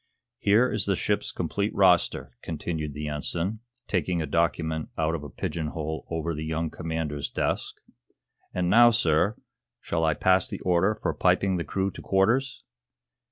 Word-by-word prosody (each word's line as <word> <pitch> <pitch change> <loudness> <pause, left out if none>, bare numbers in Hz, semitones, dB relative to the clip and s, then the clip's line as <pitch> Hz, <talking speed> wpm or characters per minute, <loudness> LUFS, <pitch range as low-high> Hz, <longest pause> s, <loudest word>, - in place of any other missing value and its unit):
Here 110 +5 +4
is - - -1
the - - +2
ship's - - -1
complete 100 +1 -2
roster," 90 -3 +3
continued 80 -2 -4
the 75 0 -4
Ensign, 85 +7 -2 0.3
taking 90 -2 0
a 80 - -1
document 80 -1 0
out 80 0 +1
of 80 -3 -3
a 75 - -7
pigeon 80 +5 -3
hole 80 0 -4
over 85 0 -2
the 75 0 -4
young 80 0 -2
commander's 75 -4 -3
desk. - - -2 0.8
"And 90 -1 -1
now, 120 +6 +7
sir, 100 -2 +2 0.4
shall 80 -1 -2
I 80 -1 +2
pass 95 0 +3
the - - -6
order 90 +4 +2
for - - -2
piping 95 -2 +2
the 85 - -2
crew 95 +5 -1
to - - -10
quarters?" 120 +7 +1
85 Hz, 160 wpm, -26 LUFS, 80-95 Hz, 0.8 s, now